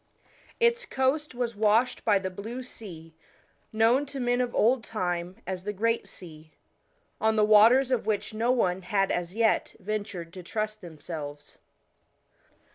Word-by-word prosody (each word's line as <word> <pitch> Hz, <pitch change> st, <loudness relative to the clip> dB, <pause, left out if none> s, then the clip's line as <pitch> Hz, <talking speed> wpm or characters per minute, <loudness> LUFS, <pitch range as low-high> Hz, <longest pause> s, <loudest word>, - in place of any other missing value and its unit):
Its 470 Hz, +1 st, +3 dB
coast 265 Hz, -, -1 dB
was 240 Hz, -2 st, -2 dB
washed 220 Hz, +4 st, +2 dB
by 210 Hz, -3 st, +4 dB
the 190 Hz, -1 st, -4 dB
blue 225 Hz, +7 st, -6 dB
sea, 165 Hz, -10 st, -11 dB, 0.6 s
known 225 Hz, +5 st, +3 dB
to 280 Hz, -1 st, -6 dB
men 245 Hz, 0 st, +1 dB
of 245 Hz, -1 st, -2 dB
old 235 Hz, +1 st, +3 dB
time 180 Hz, -4 st, -3 dB
as 185 Hz, -1 st, -4 dB
the 210 Hz, -, -2 dB
Great 225 Hz, +1 st, 0 dB
Sea, 160 Hz, -5 st, -13 dB, 0.7 s
1 220 Hz, -, +1 dB
on 220 Hz, -, +3 dB
the 215 Hz, -1 st, +4 dB
waters 230 Hz, +5 st, +6 dB
of 245 Hz, -4 st, 0 dB
which 205 Hz, -1 st, -1 dB
no 225 Hz, +3 st, 0 dB
one 190 Hz, -7 st, +1 dB
had 195 Hz, +1 st, 0 dB
as 175 Hz, +2 st, -3 dB
yet 225 Hz, -1 st, +1 dB
ventured 200 Hz, -4 st, -5 dB
to 185 Hz, -, -8 dB
trust 215 Hz, +4 st, -4 dB
themselves. 150 Hz, -3 st, -8 dB
215 Hz, 155 wpm, -27 LUFS, 180-240 Hz, 0.7 s, waters